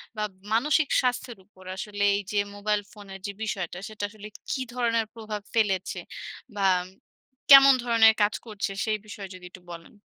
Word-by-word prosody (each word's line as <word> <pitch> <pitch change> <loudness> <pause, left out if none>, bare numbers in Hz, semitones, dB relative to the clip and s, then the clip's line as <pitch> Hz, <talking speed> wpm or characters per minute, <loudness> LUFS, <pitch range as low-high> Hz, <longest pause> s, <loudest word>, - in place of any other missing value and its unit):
বা 215 - -2 0.3
মানসিক 300 +6 +2
স্বাস্থ্যের 245 -2 -2
উপর 190 -2 -19
আসলে 205 +1 -4
এই 200 - -1
যে 205 - +1 0.2
মোবাইল 210 0 0
ফোনের 200 -2 -11
যে 205 - -4
বিষয়টা, 185 -5 -3
সেটা 215 -1 -8
আসলে 210 0 -11 0.2
কি 260 - -1
ধরনের 230 -2 +1
প্রভাব 215 -2 -6
ফেলেছে? 195 -5 0 0.6
বাম 185 -2 +2 0.7
কেমন 275 0 +11
ধরনের 230 -2 +6
কাজ 205 0 +3
করছে, 210 -3 -4
সেই 215 -1 0
বিষয়ে 200 -2 -8
যদি 180 - -12
একটু 185 - -13
বলেন? 165 -1 -10
210 Hz, 160 wpm, -26 LUFS, 195-230 Hz, 0.7 s, কেমন